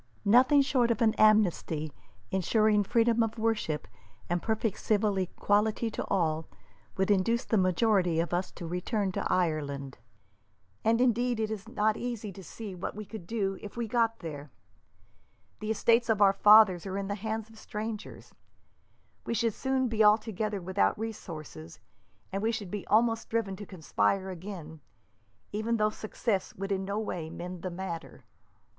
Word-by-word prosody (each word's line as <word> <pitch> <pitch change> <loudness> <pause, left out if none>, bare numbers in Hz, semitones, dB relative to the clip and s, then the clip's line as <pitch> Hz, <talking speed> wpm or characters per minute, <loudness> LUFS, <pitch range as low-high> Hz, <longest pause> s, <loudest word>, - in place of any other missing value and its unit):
"Nothing 255 +7 +6
short 255 -3 +2
of 230 - +1
an 220 -1 +4
amnesty, 175 -8 +3 0.4
ensuring 210 +3 +3
freedom 230 +2 +2
of 225 0 -1
worship, 220 -9 -1 0.4
and 175 0 +1
perfect 220 -2 -1
civil 210 -1 +1
equality 210 +4 +1
to - - -3
all, 160 -4 0 0.5
would 190 +2 +2
induce 230 +6 +2
the - - 0
majority 185 -2 +2
of 170 0 -1
us 180 +1 0
to 175 - -8
return 190 +4 -1
to - - -2
Ireland; 145 -6 -1 0.8
and, 230 +1 +3
indeed, 245 -1 +2
it 220 -1 -1
is 215 0 -5
not 215 -2 +1
easy 235 -4 -4
to 190 +1 -11
see 210 +3 -8
what 180 +1 -5
we 215 0 -6
could 195 -4 -9
do 195 -3 -2
if 210 +2 -9
we 235 -1 -2
got 230 0 +1
there. 150 -3 -7 1.1
The 215 - -5
estates 230 +2 +3
of 220 -2 +2
our 195 -1 +6
fathers 205 -3 +6
are 190 0 -3
in 200 -1 -3
the 200 - -2
hands 220 +1 -4
of 225 0 -16
strangers. 215 0 -6 0.9
We 235 - -1
should 230 0 +1
soon 265 +1 0
be 220 -2 +2
altogether 215 -1 +2
without 190 +4 +1
resources, 165 - -7 0.5
and 195 - -2
we 225 +2 +1
should 210 -5 -5
be 205 -2 -5
almost 225 +1 +2
driven 220 -4 -1
to 205 - -9
conspire 190 +2 0
again, 170 -4 -8 0.7
even 220 +3 -1
though 215 0 +2
success 215 -2 -2
would 195 +1 -5
in 190 -1 -1
no 200 +2 -2
way 180 -7 -3
mend 175 +1 -7
the 185 - -3
matter. 170 -2 -7
210 Hz, 165 wpm, -29 LUFS, 185-225 Hz, 1.1 s, Nothing